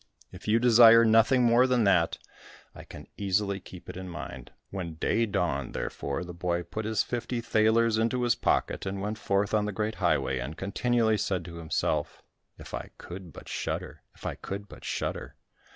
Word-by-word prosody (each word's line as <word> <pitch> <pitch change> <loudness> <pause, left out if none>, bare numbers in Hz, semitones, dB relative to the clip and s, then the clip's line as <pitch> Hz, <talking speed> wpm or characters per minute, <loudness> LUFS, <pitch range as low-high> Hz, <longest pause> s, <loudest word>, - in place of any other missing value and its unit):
If 95 +2 -12
you 110 +2 +4
desire 115 -1 +7
nothing 115 +3 +5
more 120 +2 +5
than 125 -2 +2
that, 90 -5 +3 0.6
I - - -11
can - - -11
easily 100 0 0
keep 90 -1 -13
it - - -7
in 95 0 -7
mind." 65 -7 -8 0.2
When 90 -4 -5
day 115 +8 +1
dawned, 75 - -1
therefore, 70 +5 -3
the 90 0 -8
boy 85 0 -1
put 110 +5 -5
his 110 0 +1
fifty 120 0 -3
thalers 110 0 +3
into 115 +2 +1
his 120 -1 +3
pocket, - - 0
and 95 0 -3
went 105 +2 -3
forth 100 +1 0
on 105 -1 +2
the 105 - -2
great 105 +2 -2
highway, 65 - +1
and 70 +6 -5
continually 110 +2 +1
said 90 -3 -1
to 85 -1 -8
himself, 80 -2 -2 0.3
"If - - -12
I - - -5
could 90 -1 -9
but - - -12
shudder! - - -4
If - - -15
I - - -1
could 100 +1 -6
but - - -13
shudder!" - - -4
105 Hz, 185 wpm, -28 LUFS, 90-115 Hz, 0.6 s, desire